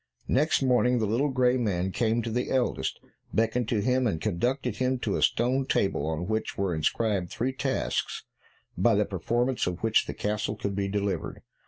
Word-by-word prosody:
Next 145 +1 +2
morning 125 -1 +3
the 110 - +1
little 120 +8 +1
grey 130 -1 +2
man 95 -6 0
came 115 +2 +1
to 115 - -3
the 125 +2 -1
eldest, 130 -2 0 0.3
beckoned 115 +1 +1
to 110 -3 +1
him, 125 +3 +2
and 80 -7 -1
conducted 120 - -1
him 130 +2 +1
to - - -2
a - - -1
stone 130 +3 +2
table, 95 -7 +1
on 80 +2 -2
which 110 +2 -2
were 95 -3 0
inscribed 90 +4 0
three 130 +3 -2
tasks, 135 0 -2 0.5
by 110 +5 +3
the 105 +1 +2
performance 120 +6 0
of 90 +2 -4
which 115 -1 +3
the - - -5
castle 105 0 -2
could 100 -1 -3
be 100 0 -1
delivered. 100 0 -2
115 Hz, 185 wpm, -27 LUFS, 100-125 Hz, 0.5 s, morning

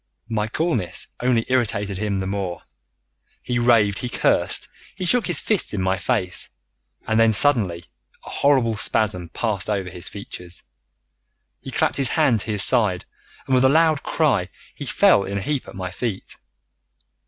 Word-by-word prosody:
My 105 -2 -1
coolness 120 - -2
only 120 -2 +1
irritated 105 -6 0
him 105 -2 -1
the 95 - -3
more. 95 -3 -4 0.8
He 120 -1 -1
raved, 115 -4 +3
he 125 - -4
cursed, - - +1 0.3
he 185 - -4
shook 240 +5 +3
his 175 -5 +4
fists 205 - 0
in 95 - -2
my 95 +1 0
face, 90 0 0 0.6
and 110 0 +1
then 115 0 +5
suddenly 105 -9 +3 0.4
a - - -9
horrible 130 -6 +2
spasm 90 -6 0
passed 110 -1 -2
over 95 -4 -2
his 90 +1 -5
features, 90 -4 -7 1.0
he - - -8
clapped - - 0
his 135 -3 +4
hand 140 -8 +2
to 110 - -4
his 105 -1 +4
side, 105 -8 +1 0.4
and 130 - -2
with 130 0 +4
a 130 - +5
loud 155 0 +3
cry - - 0 0.2
he - - -8
fell 100 - +4
in 100 +1 -4
a - - -2
heap 145 +1 -2
at - - -11
my 95 -1 -5
feet. 105 0 -4
110 Hz, 165 wpm, -22 LUFS, 95-125 Hz, 1.0 s, then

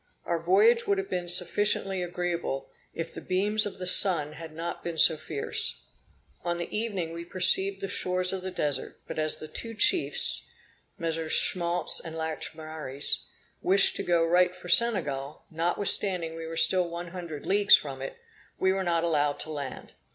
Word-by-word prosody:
Our 170 -1 -1
voyage 210 +7 +3
would 200 - +1
have 195 0 -5
been 180 -1 -3
sufficiently 195 +1 +1
agreeable, 175 -5 -4 0.2
if 165 - -6
the - - -8
beams 205 +3 0
of 200 - -9
the 185 - -6
sun 170 -5 +4
had 160 +1 -10
not 165 +2 -6
been 170 -1 -5
so 160 - +7
fierce. 150 -2 -2 0.6
On 175 0 -2
the 170 - -6
evening 200 -7 -3
we 170 0 -7
perceived 190 +2 +3
the 195 - -3
shores 180 0 0
of 190 - -4
the 185 - -5
Desert; 145 -7 -4
but - - -5
as 155 0 0
the 155 - -8
two 230 +7 -6
chiefs 340 - +3 0.5
(MM. 165 -1 -3
Schmaltz 175 +1 +2
and 165 -1 -8
Lachaumareys) 155 -3 -4 0.4
wished 195 +2 +4
to - - -3
go 170 -1 +1
right 180 +2 +2
for 185 -1 -11
Senegal, 155 -11 +1
notwithstanding 175 +1 +1
we 165 0 -7
were 165 0 -6
still 180 0 +4
one 170 +1 -7
hundred 170 -5 -8
leagues 200 +1 +6
from 135 -3 -5
it, 135 - -7 0.4
we 190 0 +1
were 195 0 -2
not 170 -2 0
allowed 145 -4 0
to 155 - -6
land. 140 -4 -7
175 Hz, 175 wpm, -27 LUFS, 160-190 Hz, 0.6 s, so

